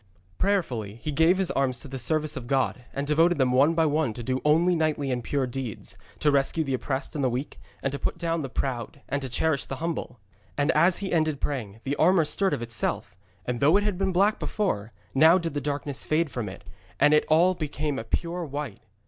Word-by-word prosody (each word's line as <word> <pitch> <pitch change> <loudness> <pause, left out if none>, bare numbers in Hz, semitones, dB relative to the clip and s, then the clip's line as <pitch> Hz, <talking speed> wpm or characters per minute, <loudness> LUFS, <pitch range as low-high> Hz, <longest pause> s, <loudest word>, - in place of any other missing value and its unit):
Prayerfully 130 - 0
he 135 +6 -5
gave 165 +5 +4
his 190 -2 0
arms 130 -2 0
to - - -9
the 135 0 -6
service 155 +3 +1
of 120 - -6
God, 130 -2 0
and 140 - -3
devoted 165 +3 +3
them 130 -3 +2
one 140 +6 +4
by 165 -1 +3
one 150 -5 +1
to 120 - -7
do 130 +2 -1
only 165 +4 +4
knightly 155 -4 0
and 125 -1 -2
pure 140 +1 0
deeds, 125 -3 -6 0.3
to 150 - +4
rescue 140 +3 +2
the 135 -3 -2
oppressed 130 +1 -3
and 145 - -2
the 130 - +3
weak, 125 +4 -4 0.2
to 140 +1 -2
put - - -2
down 165 -1 -1
the 135 - -4
proud, 130 +1 -3
and 140 - -2
to 135 - -5
cherish 140 +4 0
the 135 - -5
humble. 155 -5 -4 0.4
And 145 +3 +2
as 175 +1 +4
he 190 - -3
ended 155 -3 +1
praying, 115 -8 -4
the 135 +1 -1
armour 180 -3 +4
stirred 195 +5 +1
of 120 - -5
itself, 115 -2 -3 0.3
and 125 -1 -2
though 150 +7 +5
it 205 - +1
had 205 -3 -1
been 195 -1 +1
black 200 +4 +2
before, 115 - -2 0.2
now 160 +6 +6
did 170 -3 -3
the 145 - -2
darkness 145 -1 -3
fade 155 -1 0
from 115 -5 -3
it, 95 - -11 0.4
and 150 - +5
it 150 - +4
all 170 +4 +4
became 150 -4 -3
a - - -5
pure 170 +9 -2
white. 145 -7 -5
145 Hz, 225 wpm, -26 LUFS, 130-165 Hz, 0.4 s, now